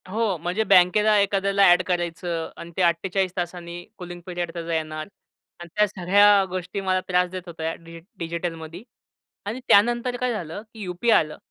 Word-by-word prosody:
हो. 210 -2 0
म्हणजे 175 +7 -1
बँकेला 210 +2 +5
एखाद्याला 200 0 +2
ऍड 175 - +5
करायचं 170 -2 -2
आणि 170 - -9
ते - - +1
48 180 +2 +1
तासांनी 175 0 -5
कूलिंग 175 -1 -8
पिरियड 175 -2 -4
त्याचा 170 -1 -4
येणार 155 -1 -3 0.5
आणि 175 0 -10
त्या 210 0 +4
सगळ्या 200 +2 +4
गोष्टी 185 +2 -4
मला 185 -1 +1
त्रास 180 0 +2
देत 185 +1 -6
होत्या, 165 -1 -4
डि 165 0 -12 0.2
डिजिटलमध्ये. 165 +1 -5 0.6
आणि 220 +5 -4
त्यानंतर 240 +4 +3
काय 250 0 -1
झालं 175 -2 -5
की 220 - -11
यू-पी-आय 190 +5 +2
आलं 155 -1 -4
180 Hz, 160 wpm, -24 LUFS, 170-200 Hz, 0.6 s, बँकेला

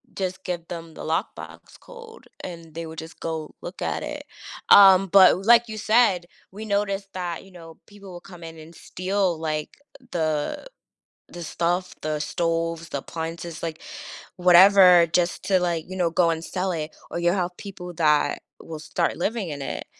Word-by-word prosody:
just 185 -1 -4
give 175 -2 -4
them 165 -1 -8
the - - -8
lockbox 160 +1 -5
code, 470 -2 -14 0.2
and 165 -3 -9
they 165 0 -5
would 160 0 -8
just 160 +1 -11
go 160 -2 -5
look 175 - -9
at - - -2
it. 295 -1 -6 0.5
Um, 195 -1 +8
but 190 0 +6
like 235 0 +6
you 215 - -6
said, 215 -5 +3 0.3
we 210 +2 -8
noticed 200 -1 -1
that, 175 -2 -4
you 195 - -17
know, 165 -2 -13
people 200 -2 -13
will 175 - -9
come 175 -3 -13
in 165 0 -10
and 160 +2 -13
steal, 185 -1 -2
like, 155 -1 -4 0.3
the 155 - -2 0.6
the 175 - -8
stuff, 175 +3 -2
the 155 0 -2
stoves, 165 0 -2
the 140 - -3
appliances, 165 +2 -6
like, 160 -1 -5 0.6
whatever, 180 0 +7
just 175 -1 0
to, 190 -2 +2
like, 170 -3 -1
you 185 - -6
know, 175 -2 +1
go 170 0 +2
and 165 -1 -1
sell 185 0 -2
it, 155 -2 -5 0.2
or - - -3
you'll 175 +1 +2
have 180 -1 -2
people 180 -3 -9
that 150 -3 +2 0.2
will 160 -1 -8
start 165 +2 -2
living 205 0 -2
in 145 -2 -6
it, - - -5
175 Hz, 175 wpm, -24 LUFS, 165-190 Hz, 0.6 s, Um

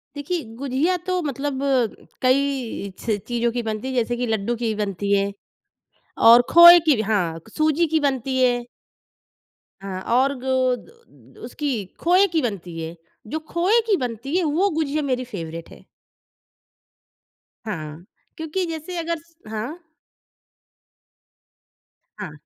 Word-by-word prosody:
देखिए, 310 +4 -3
गुजिया 280 +7 0
तो 365 -1 0
मतलब 280 -2 -3 0.6
कई 260 -5 0
च 220 -3 -1
चीज़ों 235 -1 0
की 240 - +1
बनती 220 +2 -4
है 265 - -3
जैसे 240 0 0
कि 245 - -1
लड्डू 220 +1 -1
ही - - -4
की 230 -2 0
बनती 200 -1 -2
है। 200 0 +1 1.0
और 235 +1 +9
खोए 345 +1 +10
की 300 - +6
भी 215 - -1
हाँ, 175 -6 0
क 195 - -19
सूजी 310 +2 +2
की 315 +1 +1
बनती 265 -1 -1
है। 245 -1 +2 1.2
हाँ 185 -1 -5
और 270 +3 +3
गो 260 +1 -1 0.2
द 245 - -15 0.5
द - - -19
उसकी 295 -2 -4 0.3
खोए 365 +4 +4
की 320 - +2
बनती 180 -7 -4
है। 160 +1 -6 0.3
जो 315 - -3
खोए 365 +7 +3
की 420 - +4
बनती 250 +4 -4
है 370 - +1
वो 335 +6 +2
गुजिया 305 -1 -1
मेरी 255 -2 -1
फ़ेवरेट 165 -7 -7
है। - - -15 1.8
हाँ, 165 -4 -6 0.3
क्योंकि 320 +4 -2
जैसे 330 +2 -6
अगर 335 0 -2
स 335 +1 -26
हाँ? 225 +10 -5 2.4
हाँ। 205 -6 -6
260 Hz, 145 wpm, -22 LUFS, 215-315 Hz, 2.4 s, खोए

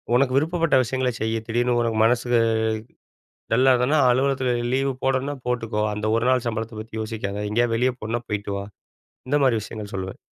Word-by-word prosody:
உனக்கு 130 0 +2
விருப்பப்பட்ட 165 0 +1
விஷயங்கள 130 +1 -1
செய்யி. 110 +1 0
திடீர்னு 120 +1 +1
உனக்கு 115 -2 -1
மனசு 120 +1 +1 1.2
டல்லா 130 +3 +5
இருந்தனா, 125 +5 +2
அலுவலகத்தில 130 0 +1 0.2
லீவு 135 +1 +1
போடணுனா 135 +2 0
போட்டுக்கோ. 115 -3 -1
அந்த 105 +1 -4
ஒரு 115 +1 +1
நாள் 130 -2 +2
சம்பளத்த 110 0 -4
பத்தி 110 +1 -14
யோசிக்காத 105 -2 -4
எங்கேயாது 120 +1 +2
வெளிய 125 +3 +2
போகணும்னா 115 +2 -3
போயிட்டு 100 -1 -3
வா." 100 - -5 0.6
இந்த 145 - +2
மாதிரி 125 -4 +3
விஷயங்கள் 105 -1 -8
சொல்லுவேன். 95 0 -5
120 Hz, 165 wpm, -23 LUFS, 110-130 Hz, 1.2 s, டல்லா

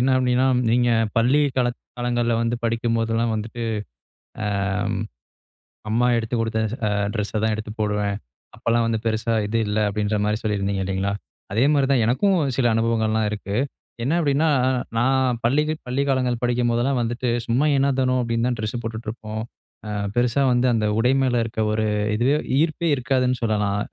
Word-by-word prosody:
என்ன 125 - +2
அப்படின்னா, 125 0 +2 0.2
நீங்க 120 +1 +3 0.3
பள்ளி 125 +6 +4 0.2
காலங் 120 -1 +1 0.2
காலங்கள்ல 120 -1 0
வந்து 115 +1 0
படிக்கும்போதெல்லாம் 115 0 0
வந்துட்டு, 110 +2 -5 0.8
அ - - -1 1.4
அம்மா 120 +3 +2
எடுத்து 115 +1 -2
குடுத்த 115 -1 -1 0.3
அ - - +1 0.2
டிரெஸ்ஸை 105 -1 -2
தான் 110 - +2
எடுத்து 110 0 -6
போடுவேன். 105 -1 0 0.4
அப்போலாம் 115 0 +1
வந்து 110 -1 0
பெருசா 110 +1 0
இது 115 +2 -1
இல்ல. 105 +1 0
அப்படின்ற 105 +1 -1
மாதிரி 105 0 +1
சொல்லியிருந்தீங்க 100 -2 -1
இல்லிங்களா. 95 +1 -1 0.4
அதே 115 +4 +3
மாரிதான், 135 -4 +3
எனக்கும் 185 - +2 0.2
சில 130 - +2
அனுபவங்கள்லாம் 110 -1 +1
இருக்கு. 100 -1 -4 0.5
என்ன 135 +6 +1
அப்படின்னா, 155 0 +2 0.5
நான் 130 0 +2
பள்ளி 140 +6 +3 0.2
பள்ளி 130 +3 0
காலங்கள் 125 -3 +1
படிக்கும்போதெல்லாம் 120 +1 +1
வந்துட்டு, 120 +1 -2 0.2
சும்மா 125 +5 +2
எனோ 135 +1 +3
தனோ 130 0 +2
அப்படின்னு 115 0 0
தான் 125 -1 -1
ட்ரெஸ் 110 +2 -3
போட்டுட்டு 110 0 -6
இருப்போம். 110 -1 -6 0.5
அ - - -5 0.3
பெருசா 120 +2 +2
வந்து 125 +1 +2
அந்த 110 -1 +1
உடை 125 +3 +3
மேல 130 -2 +1
இருக்க 110 -1 -3
ஒரு 110 0 0 0.3
இதுவே 125 +6 +2 0.3
ஈர்ப்பே 165 +1 0
இருக்காதுன்னு 125 -1 0
சொல்லலாம். 105 -2 0
115 Hz, 155 wpm, -23 LUFS, 110-125 Hz, 1.4 s, பள்ளி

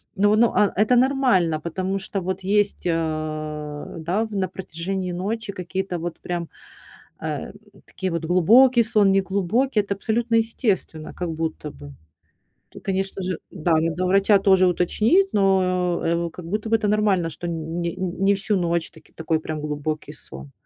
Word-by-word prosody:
Но, 205 +1 +3
но, 230 +1 +3
а, 205 - +3
это 220 +4 +4
нормально, 245 - +3
потому 185 +4 -2
что 195 -1 -3
вот 185 +1 -3
есть, 200 -1 0
а, 155 -2 -3
да, 180 +7 0
в 220 - -10
на 190 -1 0
протяжении 185 +1 -4
ночи 205 +4 -3
какие-то 185 0 -4
вот 170 0 -5
прям, 175 -2 -4 0.7
э, - - -4 0.3
такие 190 -2 -4
вот 170 -1 -2
глубокий 235 +9 +5
сон, 210 -3 +3
неглубокий. 200 +5 +1
Это 200 0 -3
абсолютно 230 +3 0
естественно, 215 - -1
как 175 -2 -4
будто 160 -1 -4
бы. 145 0 -12 0.8
Тут, - - -13
конечно 195 0 -2
же, 180 -2 -2
да, 175 -1 -2
надо 165 +3 -1
у - - +1
врача 195 +2 +4
тоже 190 -2 +4
уточнить, 220 - +2
но, 185 -3 +2 0.3
э, - - -6
как 180 - -10
будто 210 +5 -3
бы 225 - +4
это 215 -2 -1
нормально, 205 -5 +2
что 165 +2 -7
н 165 0 -4
не 185 +3 0
всю 205 +1 0
ночь 170 -2 -1
таки - - -19
такой 160 0 -1
прям 155 -1 -5
глубокий 150 +1 -4
сон. 65 +1 -11
185 Hz, 165 wpm, -23 LUFS, 165-205 Hz, 0.8 s, глубокий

